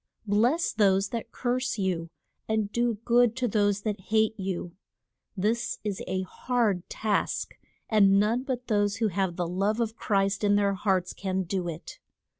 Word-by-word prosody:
Bless 230 - +2
those 195 -2 +3
that 230 -2 -5
curse 255 0 -1
you, 180 -4 -1 0.4
and 220 -2 0
do 240 0 +1
good 240 -1 +4
to 255 -1 0
those 205 -2 +1
that 210 -2 -2
hate 220 0 +3
you. 185 -3 -4 0.6
This 220 +5 0
is 205 -3 -3
a 185 +1 -1
hard 210 -2 -1
task, 215 -2 -1 0.3
and 200 -3 +5
none 220 +4 +2
but 255 -2 -4
those 205 -3 +1
who 220 0 +1
have 190 -2 -1
the 175 -1 -2
love 195 +5 0
of 225 -1 -1
Christ 195 0 0
in 205 0 +4
their 200 -1 +2
hearts 190 -2 0
can 190 -1 -2
do 180 0 -2
it. 165 0 -7
205 Hz, 165 wpm, -27 LUFS, 190-225 Hz, 0.6 s, and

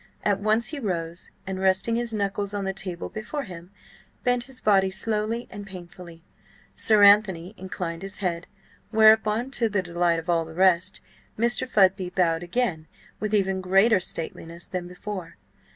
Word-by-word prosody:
At 200 -1 +1
once 215 +3 +1
he 305 - -5
rose, 170 -6 -3 0.2
and 190 -1 -4
resting 190 +4 +2
his 235 0 -1
knuckles 205 -1 -2
on 200 -1 -2
the 195 - -1
table 185 -2 -5
before 250 +7 -5
him, 175 -3 -10 0.5
bent 245 -1 +1
his 265 -1 -8
body 195 -4 +3
slowly 220 +4 -1
and 205 -2 -8
painfully. 175 -3 -10 0.5
Sir 215 -2 +4
Anthony 200 -3 +5
inclined 175 -3 -5
his 195 0 -5
head, 175 -3 -3 0.4
whereupon, 220 +2 +4
to 235 -4 +2
the 200 -3 0
delight 175 -1 +1
of 165 +1 -6
all 170 -1 +2
the 160 0 -11
rest, 185 +1 +2 0.4
Mr. 235 +2 +1
Fudby 190 -4 +3
bowed 170 -3 +1
again 175 -4 -2 0.3
with 215 -1 -2
even 190 -2 +1
greater 195 +3 +4
stateliness 170 0 -4
than 180 -2 -5
before. 180 -1 -7
195 Hz, 160 wpm, -25 LUFS, 175-215 Hz, 0.5 s, Anthony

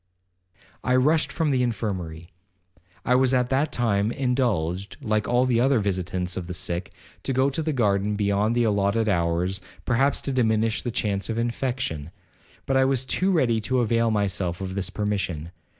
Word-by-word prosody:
'I 125 - +2
rushed 150 +5 +3
from 160 -3 0
the 130 -2 +2
infirmary. 95 -9 -3 0.7
I 125 - +3
was 130 0 +3
at 125 -1 +1
that 140 +4 +1
time 110 -3 +1
indulged, 100 -9 -1
like 110 -6 -1
all 125 +1 +3
the 120 -2 +2
other 135 +2 +3
visitants 90 -3 -1
of 90 -2 -5
the 90 - -4
sick, 85 +1 -3 0.3
to - - -3
go 135 +2 +2
to 160 - -2
the 155 0 -1
garden 105 -5 +1
beyond 100 +2 +1
the 120 - +3
allotted 105 +1 +1
hours, 90 +1 0 0.2
perhaps 135 +3 +2
to 140 - -2
diminish 110 -3 +1
the 120 - -3
chance 105 -4 -1
of 115 - -2
infection. 120 - -2 0.6
I 135 0 +3
was 130 -1 +1
but - - -5
too 190 +1 +2
ready 120 -10 +2
to 130 +4 -1
avail 115 0 +2
myself 95 -5 -1
of 95 -1 -4
this 95 -2 -2
permission. 95 -6 -2
110 Hz, 175 wpm, -25 LUFS, 95-130 Hz, 0.7 s, rushed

